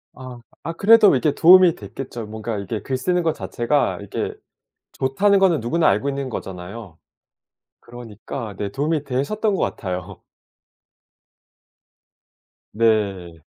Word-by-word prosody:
아. 130 -1 -10 0.2
아 165 +2 -4
그래도 210 0 +6
이게 140 +3 +1
도움이 180 0 +7
됐겠죠. 120 -4 -8
뭔가 110 0 -5
이게 105 +2 -5
글 130 -2 -3
쓰는 180 +5 0
것 160 - +1
자체가 120 +9 -1
이게 100 - -4 0.6
좋다는 195 +10 +2
거는 175 -8 +3
누구나 155 +8 +1
알고 105 +9 +1
있는 140 -1 -3
거잖아요. 95 -3 -8 0.8
그러니까 115 -1 -8
네 100 -1 -4
도움이 150 +4 -1
되셨던 195 - -1
것 - - -1
같아요. 90 -3 -4 2.5
네. 100 -7 0
125 Hz, 255 characters per minute, -21 LUFS, 105-160 Hz, 2.5 s, 도움이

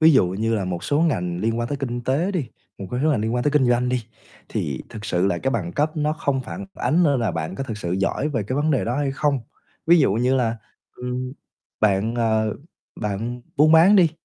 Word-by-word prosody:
Ví 160 0 +7
dụ 130 -9 +5
như 110 +5 -1
là 100 -4 -1
một 90 -2 -4
số 145 +1 +1
ngành 90 - 0
liên 115 +2 0
quan 120 0 -2
tới 145 - -2
kinh 120 -3 -3
tế 150 +10 +1
đi, 165 -10 -2 0.3
một 100 - -6
cái 125 - -2
số 155 - +4
ngành 135 -8 +1
liên 110 +2 -1
quan 125 - 0
tới 145 - +3
kinh 140 -4 +3
doanh 120 +1 +2
đi, 125 -2 -1 0.4
thì 70 -3 -3
thực 110 - -9
sự 90 -2 +1
là 90 -3 0
cái 135 - -1
bằng 95 -9 -2
cấp 155 +2 0
nó 150 0 +1
không 140 -3 -1
phản 130 - -7
ánh 170 +3 +2
nữa 145 -5 +3
là 115 -5 0
bạn 80 +1 -4
có 135 - -4
thực 115 -5 -5
sự 85 -3 -3
giỏi 100 +10 0
về 120 -8 -1
cái 130 +7 -3
vấn 155 +2 +1
đề 135 - +1
đó 120 +2 -1
hay 145 -2 0
không. 145 0 +1 0.5
Ví 170 +1 +7
dụ 135 - +3
như 125 +4 +2
là, 115 -3 +1 0.4
ừm, 125 +1 -4 0.5
bạn, 110 +2 +2
ờ, 110 -2 +1 0.5
bạn 110 +4 -3 0.2
buôn 155 +2 +5
bán 175 +6 +7
đi, 170 -4 +5
125 Hz, 250 wpm, -23 LUFS, 110-145 Hz, 0.5 s, Ví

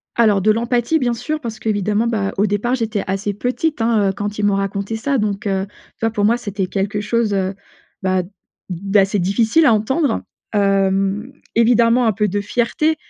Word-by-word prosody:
Alors, 215 -4 +3
de 215 +3 +4
l'empathie, 240 +6 +1
bien 245 -3 +1
sûr, 305 +6 -3
parce 230 -5 -6
qu'évidemment, 210 0 0
bah, 210 -4 -1
au 200 - +3
départ 210 +5 0
j'étais 225 -4 -2
assez 195 +2 -2
petite, 250 +7 -2
hein, 225 -3 +2
heu, - - -1
quand 205 +1 -4
ils 210 - -2
m'ont 205 -1 +3
raconté 195 +2 -2
ça. 275 +5 0
Donc, 210 -2 -2
heu, 195 -1 0
tu 205 - -26
vois, 225 - +2
pour 205 -2 0
moi, 230 +3 +3
c'était 200 -4 -3
quelque 200 +2 -2
chose, 215 0 0
heu, 190 -1 0 0.5
bah, 185 -1 +1 0.5
d'assez 195 +3 +1
difficile 220 - +2
à 235 - +6
entendre, 260 +5 0 0.3
hem, 195 +2 +1 0.2
évidemment 235 +1 +4
un 225 - +4
peu 210 +1 0
de 205 +1 -1
fierté, 245 +9 0
210 Hz, 190 wpm, -19 LUFS, 195-235 Hz, 0.5 s, à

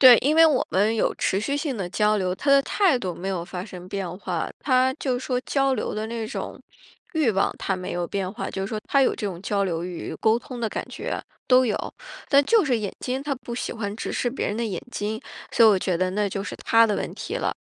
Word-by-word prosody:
对， 255 -3 +10
因 290 +3 +2
为 325 +1 +8
我 305 -5 +3
们 205 +4 +3
有 225 - +1
持 190 - 0
续 280 +7 -1
性 290 -3 -2
的 190 -4 -3
交 210 +3 +2
流， 185 -2 0
他 280 +9 -1
的 275 0 +7
态 355 -9 +3
度 185 -6 -3
没 185 +4 -5
有 180 -3 -2
发 180 0 -6
生 180 -3 -10
变 185 -2 -4
化， 180 -5 -3
他 260 -1 +3
就 255 -4 -1
说 250 -1 -1
交 275 -1 +1
流 215 - -3
的 215 +1 -2
那 230 -1 -3
种 240 - -5 0.5
欲 310 -8 +3
望， 195 -1 +1
它 190 - -1
没 185 0 -5
有 175 0 -1
变 190 -1 -2
化。 200 - -5
就 190 0 -3
说 215 +1 -3
他 275 - +4
有 - - +3
这 215 - -5
种 180 -3 -5
交 200 +1 0
流 170 -3 -1
欲， 180 -1 -5
沟 220 +1 +4
通 245 0 -8
的 225 - 0
感 - - -4
觉， - - -4 0.3
都 255 0 +6
有。 220 -4 0 0.5
但 280 -1 +5
就 445 +6 +4
是 260 -5 +2
眼 205 -3 -3
睛， 260 +1 -3
他 285 -1 -1
不 240 -1 -7
喜 - - -3
欢 205 -3 -4
直 - - -4
视 245 - 0
别 260 - -2
人 205 - -2
的 235 - -1
眼 195 -6 -3
睛， 215 -1 -3 0.3
所 230 - +6
以 220 - +9
我 200 - +5
觉 185 -1 0
得 185 +1 0
那 205 +1 0
就 195 0 -3
是 - - -6
他 230 0 +4
的 210 - 0
问 - - -3
题 - - -5
了。 - - -1
215 Hz, 280 characters per minute, -25 LUFS, 190-255 Hz, 0.5 s, 对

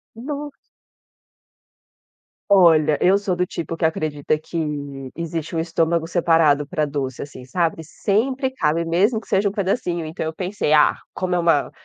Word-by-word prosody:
nossa. 290 +4 -6 1.9
Olha, 160 -6 +5
eu 190 +2 +5
sou 200 -3 -1
do 180 0 0
tipo 165 -1 -5
que 165 - -2
acredita 155 -2 0
que, 165 +2 -9 0.6
existe 165 -1 -4
um - - -1
estômago 165 0 0
separado 165 -4 +3
pra 155 +1 -1
doce 140 -3 -4
assim, 130 -3 -9
sabe, 165 +5 -1
sempre 260 - 0
cabe 165 -9 0
mesmo 200 +7 +2
que - - -19
seja 200 +1 +2
um - - -4
pedacinho 185 -4 -1
então 160 +1 -5
eu 160 - -3
pensei, 185 -4 -2
ah, 150 -1 +5 0.2
como 185 -1 -1
é - - +2
uma 165 -4 +2
170 Hz, 155 wpm, -21 LUFS, 155-195 Hz, 1.9 s, Olha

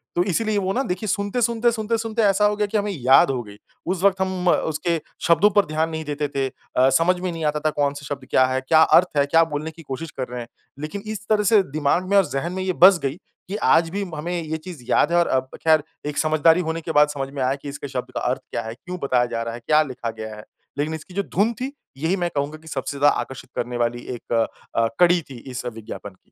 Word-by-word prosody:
तो 175 - +3
इसीलिए 210 +3 0
वो 190 0 -1
न 265 - 0
देखिए 180 +4 -3
सुनते-सुनते-सुनते-सुनते 225 +1 0
ऐसा 205 0 +4
हो 210 0 +2
गया 210 0 0
कि 215 +2 -1
हमें 205 0 -1
याद 135 -4 +5
हो 125 - -2
गई। 105 -1 -13 0.3
उस 185 +1 -2
वक़्त 195 -1 +3
हम 185 -1 -1
उसके 165 +1 +1 0.3
शब्दों 170 +5 +5
पर 205 - +6
ध्यान 155 +1 -1
नहीं 160 -1 -4
देते 145 0 -2
थे। 135 -1 +1 0.3
अ, 130 +1 +6
समझ 165 +7 +3
में 180 -1 -2
नहीं 165 -1 -5
आता 150 0 +1
था - - +5
कौन-सा 145 -1 -1
शब्द 140 -1 -5
क्या 130 - +4
है? 130 0 -1
क्या 155 +4 +4
अर्थ 180 +3 +5
है? 140 - +4
क्या 165 +3 +4
बोलने 155 0 -4
की 165 +1 -14
कोशिश 145 +2 -6
कर 130 -2 -4
रहे 125 0 -6
हैं। 115 - -8 0.3
लेकिन 155 +7 -5
इस 215 -1 -6
तरह 210 -1 +3
से 215 -3 +7
दिमाग 155 +5 +1
में 200 - +2
और 195 - +5
ज़हन 165 +6 -3
में 190 0 -3
ये 185 0 0
बस 185 0 +7
गई 135 +1 -1 0.3
कि 195 - -4
आज 165 -5 +3
भी 200 +4 -3
हमें 170 +3 -3
ये 160 0 -3
चीज़ 160 -4 -10
याद 160 - +3
है 175 - +3
और 170 - +2
अब 130 0 0
खैर 155 -2 +4 0.2
एक 150 -1 -4
समझदारी 155 +2 +4
होने 165 +1 -2
के 160 - -4
बाद 150 -1 +5
समझ 135 -1 -3
में 140 - -4
आया 130 +2 +1
कि 145 +1 -8
इसके 140 0 -6
शब्द 130 -2 -5
का - - 0
अर्थ - - -2
क्या - - -2
है? 110 - -6
क्यों 180 +8 -7
बताया 125 -3 +2
जा 115 - -1
रहा 115 - -4
है? 120 - -7
क्या 155 0 +5
लिखा 130 -4 -5
गया 110 0 -6
है? 105 - -10 0.3
लेकिन 150 +2 -1
इसकी 160 +4 -11
जो 200 +2 -1
धुन 210 +6 +3
थी 265 - -2 0.3
यही 160 +6 0
मैं 175 -2 -1
कहूँगा 145 +2 -2
कि 160 - -17
सबसे 140 -1 -4
ज़्यादा 145 +1 +4
आकर्षित 135 -1 -7
करने 120 0 -3
वाली 120 0 -1
एक 120 - -7
अ 115 -1 +3 0.4
अ, 115 - +3
कड़ी 175 0 +5
थी 130 - -9
इस 125 0 -5
विज्ञापन 115 -3 -7
की। 95 - -23
160 Hz, 260 wpm, -22 LUFS, 135-185 Hz, 0.4 s, से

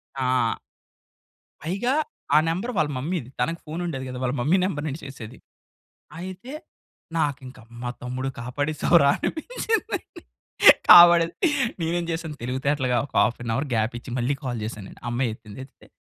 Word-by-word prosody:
ఆ! 125 -3 +1 1.1
పైగా 200 - -1 0.4
ఆ - - +8
నెంబర్ 190 +9 -2
వాళ్ళ 155 -2 +2
మమ్మీది. 145 -2 -3
తనకి 165 +7 -1
ఫోన్ 160 +2 -5
ఉండేది 135 -6 -4
గాదు. 125 -1 -6
వాళ్ళ 125 - 0
మమ్మీ 160 +9 +3
నెంబర్ 155 -5 -3
నుండి 145 +3 -4
చేసేది. 125 -3 -9 0.8
అయితే 185 +8 -8 0.6
నాకింక 135 -4 -2 0.2
మా 120 - -3
తమ్ముడు 130 +2 -3
కాపాడేసావురా 145 +5 +2
అనిపించిందండి. 445 +5 -2 0.8
కాపాడేది 170 -1 +9 0.5
నేనేం 170 +1 -1
చేశాను 160 -2 -4
తెలివితేటలుగా 130 0 0
ఒక - - -18
హాఫ్ 125 - +1
అన్ 115 - -3
అవర్ 140 +3 -2
గ్యాపిచ్చి 115 +3 -2
మళ్ళీ 125 +4 0
కాల్ 120 -3 -3
చేశాను 105 -2 -6
నేను. - - -15
ఆ - - -3
అమ్మాయి 120 0 0
ఎత్తింది. 110 0 -12
ఎత్తితే 135 - -22
140 Hz, 140 wpm, -24 LUFS, 125-170 Hz, 1.1 s, కాపాడేది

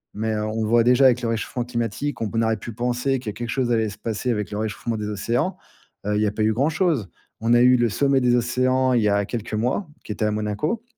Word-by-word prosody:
Mais 110 +1 -1
heu, 105 0 -1
on 110 +1 -2
voit 115 +2 +4
déjà 125 +3 +5
avec 125 -1 +5
le 120 - -1
réchauffement 115 +2 -2
climatique, 120 +4 -3
on 115 0 -1
aurait 110 -1 +1
pu 115 +2 -8
penser 125 +3 -1
que 120 -3 -6
quelque 120 +3 -5
chose 125 -2 0
allait 110 -2 +1
se 100 - -11
passer 115 +2 -2
avec 105 -5 -2
le 105 - -5
réchauffement 110 +2 -3
des 105 -1 -4
océans, 120 - -1 0.5
heu, 105 - +1
il 105 - +1
y - - +3
a 105 - +1
pas 105 - -4
eu 110 +1 +3
grand-chose. 145 - +1 0.3
On 115 +1 +2
a 120 - +6
eu 125 0 +6
le 120 -1 +2
sommet 135 +4 +2
des 125 -1 +3
océans, 130 +2 +2
il 120 - +3
y 105 - +2
a 100 0 +2
quelques 115 0 -5
mois, 125 - -1 0.2
qui 105 - -4
était 110 - -4
à 105 - +1
Monaco 105 - -2
115 Hz, 255 wpm, -23 LUFS, 105-125 Hz, 0.5 s, a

